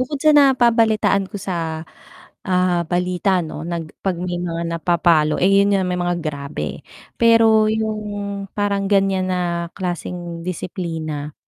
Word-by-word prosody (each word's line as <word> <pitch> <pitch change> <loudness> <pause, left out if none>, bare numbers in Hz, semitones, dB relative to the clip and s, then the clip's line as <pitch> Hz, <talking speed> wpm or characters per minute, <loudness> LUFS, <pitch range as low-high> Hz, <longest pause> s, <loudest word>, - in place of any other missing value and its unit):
bukod 270 +3 -2
sa 310 - +6
nababalitaan 235 -7 +4
ko - - -24
sa, 165 -5 -3 0.6
ah, 180 -1 +2
balita 180 +2 0
'no, 155 -1 -7
nag 170 -2 -5
'pag 190 -2 -1
may 180 -1 -3
mga 170 -1 -3
napapalo 165 -2 +2
eh, 185 - +5
yun 200 0 +2
yung 190 - 0
may 180 0 -1
mga 175 0 0
grabe, 140 - -5 0.4
pero 225 -2 +5
yung 210 -2 -3
parang 200 -1 0
ganyan 195 -2 +2
na 175 -2 -1
klaseng 175 -2 -5
disiplina, 160 -4 -4
180 Hz, 135 wpm, -20 LUFS, 170-205 Hz, 0.6 s, sa